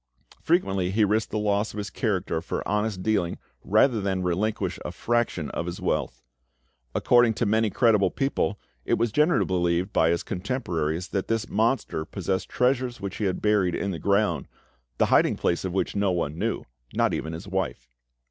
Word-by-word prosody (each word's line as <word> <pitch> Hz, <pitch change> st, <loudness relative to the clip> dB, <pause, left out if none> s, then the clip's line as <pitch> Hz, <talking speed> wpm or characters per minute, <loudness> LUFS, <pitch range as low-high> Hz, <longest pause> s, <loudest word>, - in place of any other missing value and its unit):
Frequently 95 Hz, -, +1 dB
he 105 Hz, +3 st, +3 dB
risked 110 Hz, +2 st, +1 dB
the 110 Hz, -, -2 dB
loss 105 Hz, 0 st, 0 dB
of -, -, -8 dB
his 105 Hz, -1 st, -4 dB
character 95 Hz, -7 st, -1 dB
for 85 Hz, -, -4 dB
honest 105 Hz, -3 st, -1 dB
dealing 100 Hz, -5 st, 0 dB, 0.3 s
rather 110 Hz, +2 st, +3 dB
than 95 Hz, -2 st, -1 dB
relinquish 95 Hz, +5 st, -1 dB
a -, -, -4 dB
fraction 120 Hz, -10 st, -1 dB
of 85 Hz, -, -3 dB
his 90 Hz, +1 st, -5 dB
wealth. -, -, -2 dB, 0.7 s
According 120 Hz, -2 st, +4 dB
to 115 Hz, -, 0 dB
many 110 Hz, +1 st, +2 dB
credible 110 Hz, -4 st, +3 dB
people, 135 Hz, -7 st, -1 dB, 0.2 s
it -, -, +1 dB
was 115 Hz, 0 st, 0 dB
generally 150 Hz, +7 st, +3 dB
believed 90 Hz, +1 st, 0 dB
by 80 Hz, -, +4 dB
his 85 Hz, 0 st, 0 dB
contemporaries 90 Hz, -, -2 dB
that 95 Hz, -2 st, -2 dB
this 115 Hz, -1 st, -1 dB
monster 110 Hz, -6 st, 0 dB
possessed 95 Hz, +2 st, -3 dB
treasures 125 Hz, -1 st, +1 dB
which 100 Hz, 0 st, -5 dB
he 105 Hz, -, -1 dB
had 95 Hz, -2 st, -2 dB
buried 105 Hz, -4 st, +2 dB
in 100 Hz, -, -2 dB
the 85 Hz, -, -4 dB
ground, 100 Hz, +1 st, +1 dB, 0.5 s
the -, -, +4 dB
hiding -, -, +4 dB
place 85 Hz, -, 0 dB
of 95 Hz, -, -2 dB
which 95 Hz, -, -1 dB
no 100 Hz, -1 st, +2 dB
one 80 Hz, -4 st, -1 dB
knew, -, -, -2 dB, 0.3 s
not -, -, +2 dB
even 80 Hz, +1 st, -3 dB
his 85 Hz, +5 st, -7 dB
wife. 95 Hz, -9 st, -3 dB
100 Hz, 180 wpm, -26 LUFS, 90-110 Hz, 0.7 s, According